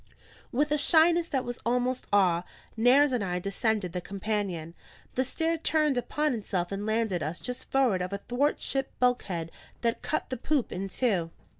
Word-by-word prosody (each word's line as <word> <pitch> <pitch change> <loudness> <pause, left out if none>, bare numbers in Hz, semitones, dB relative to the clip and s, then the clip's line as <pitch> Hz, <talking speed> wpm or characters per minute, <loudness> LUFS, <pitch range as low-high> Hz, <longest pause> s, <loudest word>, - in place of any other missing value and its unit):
With 295 +4 +1
a 300 - +3
shyness 335 +3 +5
that 265 -5 -1
was 245 0 -5
almost 250 +2 0
awe, 185 -4 +4 0.3
Nares 260 +5 +5
and 245 -5 0
I 180 -2 -1
descended 200 0 0
the 180 - -2
companion. 195 -4 -3 0.4
The 260 - +1
stair 325 +5 -1
turned 305 -3 +2
upon 295 +4 0
itself 190 -5 -2
and 200 +2 -3
landed 220 -5 0
us 155 +4 -3
just 250 -1 -6
forward 250 -9 +3
of 180 +1 -3
a 200 - -2
thwart 255 +8 0
ship 270 -1 -2
bulkhead 190 -10 0 0.3
that 230 -1 0
cut - - -2
the 255 - -2
poop 275 +1 0
in 190 +2 -3
two. 190 -5 0
230 Hz, 175 wpm, -28 LUFS, 190-270 Hz, 0.4 s, shyness